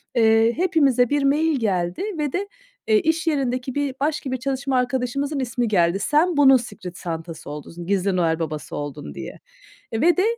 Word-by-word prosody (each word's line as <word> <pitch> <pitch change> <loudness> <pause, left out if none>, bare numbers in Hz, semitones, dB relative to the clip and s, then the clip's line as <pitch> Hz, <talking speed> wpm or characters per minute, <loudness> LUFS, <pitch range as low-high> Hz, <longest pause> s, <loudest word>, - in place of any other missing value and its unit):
Eee, 225 0 +4
hepimize 280 -9 +3
bir 290 -1 +1
mail 295 +1 +2
geldi 180 - -1
ve 295 -3 -2
de, 390 +3 -2 0.4
eee, 435 -1 +5
iş 325 0 0
yerindeki 260 -4 -1
bir 285 -2 -1
başka 290 -2 -1
bir 260 - -1
çalışma 270 +1 -1
arkadaşımızın 260 +3 -1
ismi 245 -2 -1
geldi. 180 -3 +2
"Sen 305 - +2
bunun 270 -2 +7
Secret 200 -7 -8
Santa'sı 165 -1 -6
oldun, 160 +4 -8
gizli 195 -1 +1
Noel 165 -2 +1
Baba'sı 155 -2 -4
oldun." 145 0 -6
diye. - - -8 0.5
Eee, 225 0 -2
ve 345 +3 +4
de, 370 - +3
255 Hz, 175 wpm, -22 LUFS, 185-290 Hz, 0.5 s, bunun